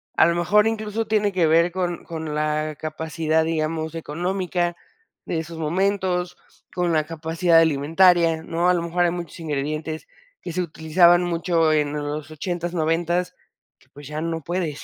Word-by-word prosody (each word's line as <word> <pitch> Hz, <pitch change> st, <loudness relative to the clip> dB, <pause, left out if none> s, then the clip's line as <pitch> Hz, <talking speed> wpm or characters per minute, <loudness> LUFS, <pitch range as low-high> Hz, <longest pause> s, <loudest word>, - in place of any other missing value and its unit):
a -, -, +6 dB
lo 170 Hz, -, +1 dB
mejor 210 Hz, +6 st, +3 dB
incluso 220 Hz, 0 st, -2 dB
tiene 210 Hz, -2 st, +1 dB
que 175 Hz, -4 st, +2 dB
ver 170 Hz, +2 st, +4 dB
con 175 Hz, -1 st, -3 dB
con 160 Hz, -2 st, -5 dB
la 155 Hz, 0 st, -1 dB
capacidad, 160 Hz, 0 st, -1 dB
digamos, 160 Hz, 0 st, -2 dB
económica 175 Hz, +2 st, -2 dB, 0.5 s
de 165 Hz, -, -2 dB
esos 165 Hz, +1 st, -7 dB
momentos, 180 Hz, +2 st, -1 dB, 0.4 s
con 175 Hz, -2 st, 0 dB
la 155 Hz, -1 st, +2 dB
capacidad 165 Hz, +1 st, +1 dB
alimentaria, 165 Hz, +2 st, +3 dB
¿no? 170 Hz, +2 st, 0 dB
A 180 Hz, -, +5 dB
lo 170 Hz, -, -1 dB
mejor 175 Hz, +1 st, +1 dB
hay 170 Hz, -, +2 dB
muchos 175 Hz, -2 st, -6 dB
ingredientes 155 Hz, +1 st, -3 dB, 0.3 s
que -, -, -6 dB
se 180 Hz, -, 0 dB
utilizaban 170 Hz, +2 st, +3 dB
mucho 170 Hz, -2 st, +1 dB
en 150 Hz, -1 st, +1 dB
los 150 Hz, +1 st, -4 dB
ochentas, 175 Hz, +2 st, -4 dB
noventas, 170 Hz, +2 st, 0 dB, 0.4 s
que -, -, -27 dB
pues 145 Hz, -1 st, -12 dB
ya 150 Hz, +1 st, -4 dB
no 165 Hz, 0 st, -3 dB
puedes, 170 Hz, -2 st, -3 dB
165 Hz, 160 wpm, -23 LUFS, 155-175 Hz, 0.5 s, a